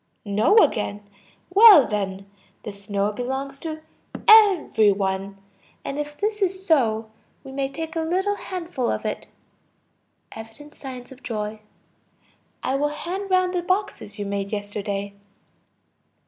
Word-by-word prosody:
No, 210 Hz, -, +3 dB
again. 205 Hz, -, +2 dB, 0.5 s
Well 400 Hz, -, +9 dB
then, 195 Hz, -2 st, -3 dB, 0.4 s
the 210 Hz, -, -6 dB
snow 200 Hz, 0 st, -2 dB
belongs 265 Hz, +4 st, -4 dB
to 315 Hz, -1 st, -6 dB, 0.4 s
every 390 Hz, -, +6 dB
one. 195 Hz, 0 st, -2 dB, 0.5 s
And 275 Hz, +1 st, -4 dB
if 295 Hz, 0 st, -5 dB
this 420 Hz, 0 st, -2 dB
is 380 Hz, 0 st, -1 dB
so, 225 Hz, -, +1 dB, 0.3 s
we 270 Hz, -, -10 dB
may 270 Hz, 0 st, -2 dB
take 320 Hz, +3 st, -6 dB
a -, -, 0 dB
little 370 Hz, +5 st, 0 dB
handful 340 Hz, -11 st, -4 dB
of -, -, -3 dB
it. -, -, -4 dB, 1.0 s
(Evident 225 Hz, +7 st, -11 dB
signs 255 Hz, -2 st, -9 dB
of 265 Hz, 0 st, -13 dB
joy.) 215 Hz, -1 st, -4 dB, 1.0 s
I -, -, -1 dB
will 295 Hz, +1 st, +1 dB
hand 365 Hz, +6 st, -5 dB
round 370 Hz, -1 st, +2 dB
the 355 Hz, -, 0 dB
boxes 370 Hz, -, -2 dB
you 205 Hz, -, -4 dB
made 200 Hz, 0 st, -3 dB
yesterday. 205 Hz, -1 st, -4 dB
265 Hz, 135 wpm, -23 LUFS, -, 1.0 s, Well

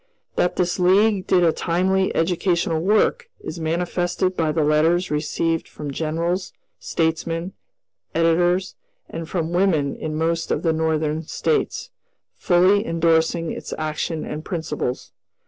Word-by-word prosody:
That 175 Hz, -, +1 dB
this 175 Hz, 0 st, 0 dB
League 195 Hz, +2 st, +3 dB
did 180 Hz, -1 st, +4 dB
a 165 Hz, -, +5 dB
timely 190 Hz, +2 st, 0 dB
educational 170 Hz, 0 st, +1 dB
work 220 Hz, -, +2 dB
is 170 Hz, -, -7 dB
manifested 175 Hz, +3 st, -1 dB
by 160 Hz, -3 st, +1 dB
the 155 Hz, 0 st, +1 dB
letters 160 Hz, +4 st, +2 dB
received 160 Hz, +2 st, -1 dB
from 145 Hz, -2 st, -7 dB
generals, 165 Hz, +5 st, -2 dB, 0.3 s
statesmen, 165 Hz, +2 st, -2 dB, 0.6 s
editors, 175 Hz, +3 st, +2 dB, 0.3 s
and 165 Hz, -1 st, -7 dB
from 170 Hz, -2 st, -2 dB
women 170 Hz, -7 st, +2 dB
in 155 Hz, -1 st, -4 dB
most 165 Hz, +1 st, -1 dB
of -, -, -1 dB
the 165 Hz, -2 st, +2 dB
Northern 160 Hz, -1 st, 0 dB
States, 460 Hz, -, -1 dB, 0.4 s
fully 185 Hz, +3 st, +3 dB
indorsing 165 Hz, -1 st, +1 dB
its -, -, -6 dB
action 155 Hz, +1 st, -3 dB
and 150 Hz, +1 st, -5 dB
principles. 155 Hz, -8 st, -4 dB
165 Hz, 130 wpm, -22 LUFS, 160-180 Hz, 0.6 s, a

